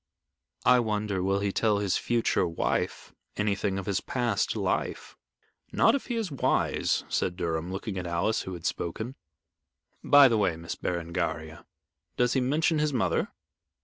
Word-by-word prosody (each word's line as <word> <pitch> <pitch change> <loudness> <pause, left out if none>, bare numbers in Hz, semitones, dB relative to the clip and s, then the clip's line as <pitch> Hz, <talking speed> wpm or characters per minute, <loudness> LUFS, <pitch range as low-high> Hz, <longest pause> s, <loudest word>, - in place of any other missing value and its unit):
"I 125 +1 +6
wonder 105 -4 -1
will 95 +2 +1
he 100 -1 0
tell 105 +1 +2
his 100 -2 0
future 115 -6 +1
wife 85 - -2 0.2
anything 100 -2 0
of 95 - -4
his 100 -1 -1
past 120 -2 -1
life." - - -2 0.6
"Not - - +4
if 280 - -2
he 240 - -2
is 220 -7 -2
wise," 140 - +1
said 90 - -1
Durham, 85 -1 -2
looking 95 0 -4
at 90 - -5
Alice, 85 +6 0
who 95 - -6
had 85 -2 -8
spoken. 110 +9 -3 0.9
"By 145 -1 +8
the 115 -3 +2
way, 95 -5 +1
Miss 85 0 -5
Berengaria, 85 -2 -3 0.5
does 125 0 +2
he 130 - +2
mention 155 +5 +1
his 150 0 +1
mother?" 95 -10 +1
100 Hz, 155 wpm, -28 LUFS, 90-125 Hz, 0.9 s, By